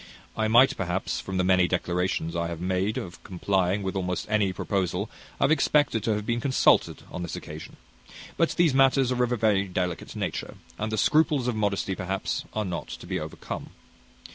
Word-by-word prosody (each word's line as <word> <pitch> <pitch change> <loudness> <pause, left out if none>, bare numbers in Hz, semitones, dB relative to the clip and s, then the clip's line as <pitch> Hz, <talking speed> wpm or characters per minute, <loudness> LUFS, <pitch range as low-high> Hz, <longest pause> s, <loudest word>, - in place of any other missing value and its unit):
I 110 0 +1
might, 120 +4 +6
perhaps, 95 0 -2
from 95 -1 -4
the 90 - +2
many 90 -1 +4
declarations 90 -2 -1
I 85 0 0
have 85 -1 -5
made 95 +5 0
of 95 -9 -7
complying 95 +1 0
with 95 +1 -3
almost 90 -1 -2
any 105 -3 +2
proposal, 95 +1 -2 0.3
have 140 - +3
expected 145 -6 +3
to 110 - +2
have 105 0 -4
been 120 +1 -1
consulted 130 0 +3
on - - -5
this 85 - -4
occasion; 75 +1 -8 0.6
but 165 - +2
these 170 -5 +3
matters 135 -1 +4
are 125 -1 +2
of 125 - 0
a 120 - +1
very 105 -3 +2
delicate 90 -2 -3
nature, - - -4 0.2
and 110 +1 -2
the 110 - -1
scruples 150 +1 +3
of 125 - 0
modesty, 100 -2 0
perhaps, 95 +1 -3
are 110 -1 0
not 90 -3 -4
to - - -8
be - - -2
overcome. - - -6
100 Hz, 190 wpm, -26 LUFS, 90-120 Hz, 0.6 s, might